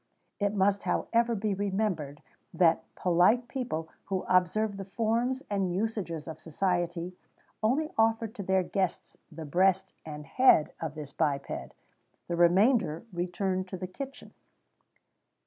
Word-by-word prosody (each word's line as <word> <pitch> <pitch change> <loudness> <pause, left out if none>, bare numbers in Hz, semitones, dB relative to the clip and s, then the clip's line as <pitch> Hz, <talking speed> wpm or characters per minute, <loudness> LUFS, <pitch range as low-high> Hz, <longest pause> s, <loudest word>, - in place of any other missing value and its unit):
[XVII 205 - +1
45] 200 - +2
It 210 - -5
must, 195 +1 +3
however, 235 0 +1
be 210 0 -1
remembered 190 -7 -2 0.3
that 170 -3 +4
polite 185 +8 +3
people, 235 -13 -3 0.2
who 190 -1 -2
observed 195 +3 +2
the 195 - -5
forms 235 +6 0
and 195 -3 0
usages 185 -5 -2
of 160 - -8
society, 175 +1 -1 0.5
only 270 +8 +1
offered 225 0 +2
to 215 - -6
their 190 -1 +2
guests 190 -1 -2 0.2
the 160 0 -7
breast 185 +5 +2
and 150 -1 -8
head 205 - +4
of 160 -2 -4
this 150 -3 -7
biped; 140 -2 -2 0.5
the 175 - -1
remainder 175 - +3
returned 185 +2 -1
to 185 - -6
the 185 - -5
kitchen. 270 +9 -8
190 Hz, 140 wpm, -29 LUFS, 170-220 Hz, 0.5 s, that